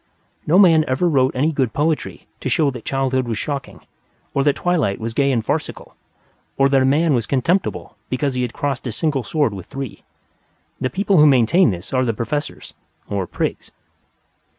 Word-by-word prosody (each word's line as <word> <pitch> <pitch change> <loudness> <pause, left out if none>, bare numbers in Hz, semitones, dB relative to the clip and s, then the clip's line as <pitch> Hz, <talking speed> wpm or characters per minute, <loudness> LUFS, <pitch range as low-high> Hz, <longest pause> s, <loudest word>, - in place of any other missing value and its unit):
No 165 +4 +4
man 165 -5 +6
ever 130 +7 +1
wrote 135 -5 +2
any 145 +5 +1
good 130 -6 -1
poetry 155 +1 -2
to - - -3
show 145 +2 +2
that 125 -3 -9
childhood 130 -2 0
was 115 -2 -2
shocking, 140 0 -5 0.5
or 140 - +1
that 145 0 +2
twilight 165 - 0
was 115 +1 -4
gay 140 +3 +2
and 115 -4 -1
farcical, - - -4 0.6
or 135 - +4
that 135 -1 +3
a - - +3
man 150 +4 +3
was 120 -4 0
contemptible 165 +8 -1
because 135 +1 -1
he 125 - -2
had 125 -2 -2
crossed 140 -1 -3
his 120 - -3
single 150 -4 0
sword 145 -7 0
with 95 -3 -9
three. 135 -3 -7 0.8
The 130 - -1
people 195 0 +2
who 150 - +7
maintain 135 +5 +4
this 90 +3 -6
are 130 0 +2
the 115 -3 -1
Professors, 145 +7 -4 0.4
or 100 -3 -2
Prigs. - - -3
135 Hz, 185 wpm, -20 LUFS, 125-150 Hz, 0.8 s, who